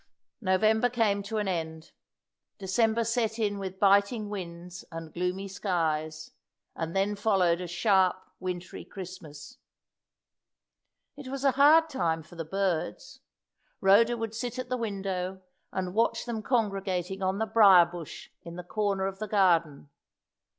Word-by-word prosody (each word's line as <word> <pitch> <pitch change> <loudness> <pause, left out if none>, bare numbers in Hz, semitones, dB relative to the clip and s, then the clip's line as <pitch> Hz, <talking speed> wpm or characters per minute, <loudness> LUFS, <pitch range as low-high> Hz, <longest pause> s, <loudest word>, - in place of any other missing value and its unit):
'" - - -57
November 220 +5 +3
came 220 -4 +1
to 215 +2 -4
an 210 -2 -1
end. 160 -3 -4 0.7
December 220 +4 +1
set 230 -1 -1
in 205 -3 -1
with 190 -1 -6
biting 200 +2 +3
winds 175 -3 -7
and 165 -1 -8
gloomy 180 +3 -2
skies, 160 -5 -2 0.4
and 165 +1 -4
then 195 +2 +1
followed 190 -5 +2
a 180 - -4
sharp, 185 +1 +3 0.2
wintry 180 -1 -5
Christmas. 185 - -10 1.6
It 285 -2 -10
was 270 +1 -5
a 275 - +5
hard 300 +5 +6
time 165 - -1
for 155 - -18
the 165 - -4
birds. 195 - -3 0.6
Rhoda 225 +5 +4
would 225 -1 -4
sit 240 +2 -4
at 255 -1 -5
the 255 - 0
window 190 -4 -4 0.3
and 185 -1 -3
watch 230 +3 +1
them 235 -3 -3
congregating 195 -5 -1
on 190 +1 0
the 220 - 0
brier 200 -5 +7
bush 170 -2 -9
in 170 0 -9
the 180 - -7
corner 200 0 -1
of 195 0 -4
the 215 - -4
garden. 165 -8 +2
195 Hz, 145 wpm, -28 LUFS, 180-220 Hz, 1.6 s, brier